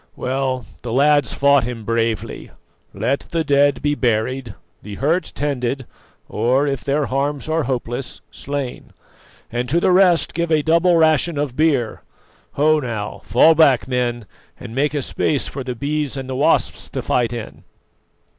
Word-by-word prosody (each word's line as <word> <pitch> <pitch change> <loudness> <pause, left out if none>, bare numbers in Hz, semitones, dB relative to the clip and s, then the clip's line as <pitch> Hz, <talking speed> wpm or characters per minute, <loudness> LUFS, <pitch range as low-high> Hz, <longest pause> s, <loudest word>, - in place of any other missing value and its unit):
Well, 130 -2 -2 0.2
the 120 - -5
lads 145 +3 +3
fought 140 -2 +4
him 115 -2 -6
bravely. 115 -1 -2 0.4
Let 140 +2 -1
the 165 -1 -1
dead 145 -1 +2
be 145 0 +2
buried, 120 -2 -1 0.3
the 105 0 -8
hurt 160 - 0
tended, 135 -2 -2 0.4
or, 125 +6 +1
if 140 -3 -2
their 145 +1 0
harms 140 +2 -2
are 160 -1 0
hopeless, 125 0 -4
slain, 140 -3 -6 0.6
and 120 +1 -2
to 170 - +2
the 185 - +2
rest 180 -2 +4
give 170 -1 -2
a 155 -2 +3
double 170 +2 +3
ration 160 0 +2
of 145 -4 -2
beer. 140 -7 +1 0.5
Ho, 155 +2 +3
now, 110 -6 -5
fall 160 +7 +5
back, 140 -7 +4
men, 120 -3 -1 0.3
and 110 - -9
make 145 +3 0
a 145 - -1
space 140 +2 -1
for 135 - -6
the 125 -1 -4
Bees 145 +2 -2
and 135 -1 -5
the 130 - -4
Wasps 150 +5 +1
to - - -4
fight 120 -2 0
in." 120 -2 -7
135 Hz, 160 wpm, -20 LUFS, 125-150 Hz, 0.6 s, fall